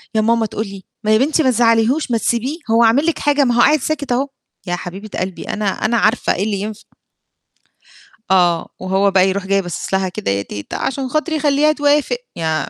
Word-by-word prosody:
يا 215 - +3
ماما 230 0 +2
تقول 215 0 -4
لي: 195 -1 -10 0.2
"ما 215 - +1
يا 215 - +6
بنتي 300 +5 +2
ما 260 - +3
تزعليهوش 235 +4 +2
ما 230 - +2
تسيبيه 245 +7 -1
هو 230 +1 +5
عامل 235 +7 +4
لِك 335 - 0
حاجة 290 -1 +2
ما 245 -2 +1
هو 240 - +1
قاعد 305 0 +5
ساكت 285 -1 -3
أهو" 260 +3 +1 0.4
يا 175 - 0
حبيبة 190 +4 -7
قلبي 185 -1 -4
أنا 210 -1 -4
أنا 220 +4 0
عارفة 220 +2 +2
إيه 190 - -1
اللي 205 -2 -1
ينفع. 215 +1 -6 1.5
آه 175 -3 +3
وهو 190 +2 +1
بقى 190 0 +4
يروح 195 0 -2
جاي 195 0 +2
باصص 175 +2 -5
لها 190 0 +1
كده 170 - -4
يا 100 0 0
تيتة 100 0 -7
عشان 270 0 -3
خاطري 310 +3 -1
خليها 295 +1 +3
توافق 295 - +1 0.2
يا 160 -1 -1
225 Hz, 210 wpm, -18 LUFS, 190-275 Hz, 1.5 s, يا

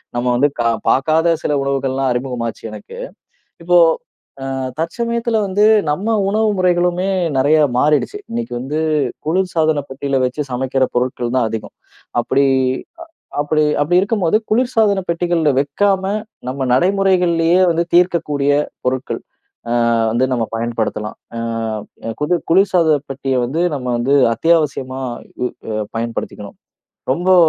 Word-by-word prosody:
நம்ம 120 0 -1
வந்து 135 +4 +4
க - - +2 0.3
பார்க்காத 160 +5 +3
சில 150 - +1
உணவுகள்லாம் 135 -1 0
அறிமுகமாச்சு 125 -2 -3
எனக்கு. 105 -1 -10 0.7
இப்போ 175 +1 +4 0.7
அ - - -2 0.3
தற்சமயத்துல 235 +6 -1
வந்து, 200 +2 +3 0.2
நம்ம 210 +9 0
உணவு 220 +1 +2
முறைகளுமே 180 0 +1 0.3
நெறைய 145 +4 +4 0.2
மாறிடுச்சு. 150 - +1
இன்னைக்கு 230 - -4
வந்து 145 +5 -3 0.5
குளிர்சாதன 160 -3 +1
பெட்டில 135 0 -1
வச்சு 140 +3 -4
சமைக்கிற 130 +1 0
பொருட்கள் 125 -1 -1
தான் 120 -3 +1
அதிகம். 110 -1 -6 0.4
அப்படி 140 0 +2 0.9
அப்படி 155 +1 +1 0.2
அப்படி 160 +5 +2
இருக்கும்போது 200 -2 +1
குளிர்சாதன 220 -4 +2
பெட்டிகள்ல 170 -2 +1
வைக்காம, 190 +7 +1 0.4
நம்ம 135 +1 -2
நடைமுறைகள்லேயே 180 0 +3
வந்து 170 0 +1
தீர்க்கக்கூடிய 165 -5 +2 0.3
பொருட்கள், 130 +1 -2 0.5
அ - - 0 0.4
வந்து 120 +4 +2
நம்ம 120 -3 +1
பயன்படுத்தலாம். 115 -2 -3 0.2
அ - - -3 0.8
குது 150 +4 +1 0.2
குளிர்சாதன 175 -4 +4
பெட்டிய 135 -1 -2
வந்து, 150 +8 -1
நம்ம 130 -3 -5
வந்து 130 +4 +1 0.2
அத்தியாவசியமா 135 -2 +1 0.4
உ - - +1 0.5
பயன்படுத்திக்கணும். 115 -3 -5 0.6
"ரொம்போ 180 +6 +3
150 Hz, 115 wpm, -18 LUFS, 130-180 Hz, 0.9 s, வந்து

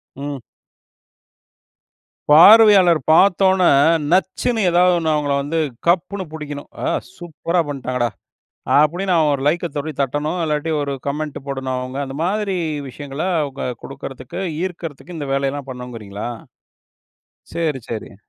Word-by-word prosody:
ம். 140 0 -5 1.9
பார்வையாளர் 190 0 +8
பார்த்தோனே 190 +1 +4 0.4
நச்சுன்னு 190 +5 +1
ஏதாவது 180 +1 +4
ஒண்ணு, 160 -1 -1
அவங்கள 145 -1 0
வந்து 145 +4 -3 0.3
கப்புனு 185 +3 +1
புடிக்கணும். 150 -2 -7 0.2
"ஆ! - - 0 0.3
சூப்பரா 170 0 -2
பண்ட்டாங்கடா" 130 -4 -2 0.7
அப்டின்னு 175 +5 +2
அவன் 155 -2 +3
ஒரு 135 - -3
லைக்க 170 +4 +1
தொடி 150 +2 -3
தட்டணும் 145 +5 -1
இல்லாட்டி 150 +1 -1
ஒரு 140 -1 -3
கமெண்ட் 150 +1 -3
போடணும் 135 -2 -3
அவங்க. 130 +1 -5
அந்த 135 +1 -7
மாதிரி 200 +1 -1 0.3
விஷயங்கள 140 +3 -7 0.2
அவங்க 140 -1 -5 0.2
குடுக்குறதுக்கு, 135 +2 -8 0.2
ஈர்க்கிறதுக்கு 175 -2 -6
இந்த 145 -2 -5
வேலையெல்லாம் 140 0 -2
பண்ணுங்கிறீங்களா? 115 -5 -7 1.3
சரி, 155 -5 -1
சரி. 110 -3 -6
150 Hz, 115 wpm, -20 LUFS, 135-175 Hz, 1.9 s, பார்வையாளர்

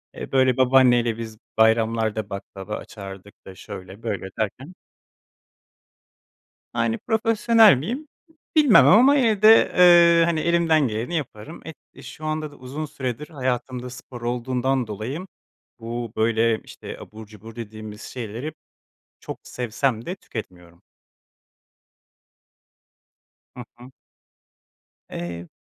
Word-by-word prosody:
E, - - -8
böyle 130 -1 +3
babaanne 130 -1 +5
ile 115 -1 -1
biz 110 -2 -7 0.2
bayramlarda 110 -1 +2
baklava 100 +1 -7
açardık 100 -1 -10
da 95 -1 -11
şöyle 95 +5 -10
böyle 95 -4 -4
derken. 130 - -4 2.0
Yani, 115 -1 0
profesyonel 225 - +5
miyim? 250 - -5 0.5
Bilmem 295 -8 +6
ama 265 +6 +6
evde, 220 -3 +6 0.2
eee, 170 -2 +7
hani, 170 -2 0
elimden 165 -4 +2
geleni 115 +9 -3
yaparım. 145 0 -6 0.3
E, - - -14
şu 155 - -10
anda 155 -1 -3
da - - -15
uzun 135 +5 -6
süredir 130 0 -5
hayatımda 125 -2 -3
spor 125 -1 -11
olduğundan 125 +1 -1
dolayı 125 - -5 0.5
bu, 115 0 -5
böyle, 115 0 +2
işte, - - -10
abur 110 0 -11
cubur 110 +2 -13
dediğimiz 110 -1 -9
şeyleri 125 +5 -6 0.7
çok - - -7
sevsem 120 0 -2
de 185 +3 -4
tüketmiyorum. 90 -6 -10 2.8
Hı 125 - -6
hı. 125 +2 -14 1.2
Eee, 85 0 -6
120 Hz, 110 wpm, -23 LUFS, 110-155 Hz, 2.8 s, eee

